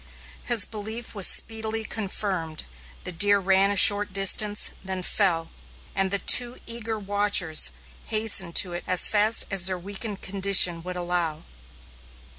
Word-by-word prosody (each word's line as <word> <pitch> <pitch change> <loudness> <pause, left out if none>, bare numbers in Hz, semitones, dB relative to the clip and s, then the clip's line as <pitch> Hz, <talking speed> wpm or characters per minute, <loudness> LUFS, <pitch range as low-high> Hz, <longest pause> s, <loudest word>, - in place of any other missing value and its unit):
His 235 -3 +1
belief 220 +2 -9
was 200 -4 +2
speedily 220 0 -1
confirmed. 190 -7 -6 0.4
The - - -7
deer 205 +4 +2
ran 195 0 0
a 205 - -3
short 205 +1 +5
distance, 205 +2 +1
then 190 -1 -7
fell, 175 -5 -2 0.4
and 195 0 -3
the 200 - -2
two 245 +4 +3
eager 230 -1 -5
watchers 200 - +1 0.3
hastened 210 -5 +2
to 180 -2 +4
it 175 - -8
as 185 -1 +5
fast 215 +2 +1
as 190 -2 +3
their 185 -1 -4
weakened 200 +3 -9
condition 190 -3 +3
would 180 +1 -9
allow. 175 -3 -5
200 Hz, 140 wpm, -23 LUFS, 180-215 Hz, 0.4 s, short